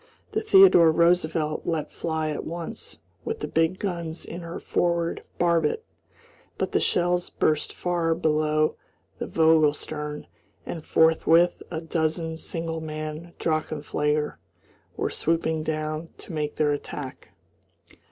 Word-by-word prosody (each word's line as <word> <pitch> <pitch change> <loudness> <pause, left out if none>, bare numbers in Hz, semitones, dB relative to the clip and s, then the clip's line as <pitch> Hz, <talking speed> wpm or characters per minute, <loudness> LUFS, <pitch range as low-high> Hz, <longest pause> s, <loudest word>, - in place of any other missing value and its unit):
The 435 - 0
Theodore 385 - +7
Roosevelt 160 -2 +2
let 160 -3 -1
fly 160 -1 -2
at 150 - -4
once 170 0 -7 0.3
with 450 0 -4
the - - -2
big 165 +3 +1
guns 170 -4 -4
in 175 - -7
her 170 0 -6
forward 170 -1 0 0.2
barbette, 170 - +2 0.7
but - - -1
the - - +2
shells 175 0 +1
burst 155 -1 0
far 170 -2 0
below 155 0 +1 0.4
the - - -3
Vogel 160 -2 +4
stern, 150 -1 -6 0.4
and 165 -3 -5
forthwith 165 +2 +4
a 160 -2 -4
dozen 160 0 -1
single 165 0 -3
man 155 +2 -6
drachenflieger 150 -1 -1 0.6
were - - -1
swooping 160 -1 0
down 155 +1 -3
to - - -10
make 150 -1 -2
their 150 -1 +2
attack. 145 -2 -6
160 Hz, 125 wpm, -26 LUFS, 155-170 Hz, 0.7 s, Theodore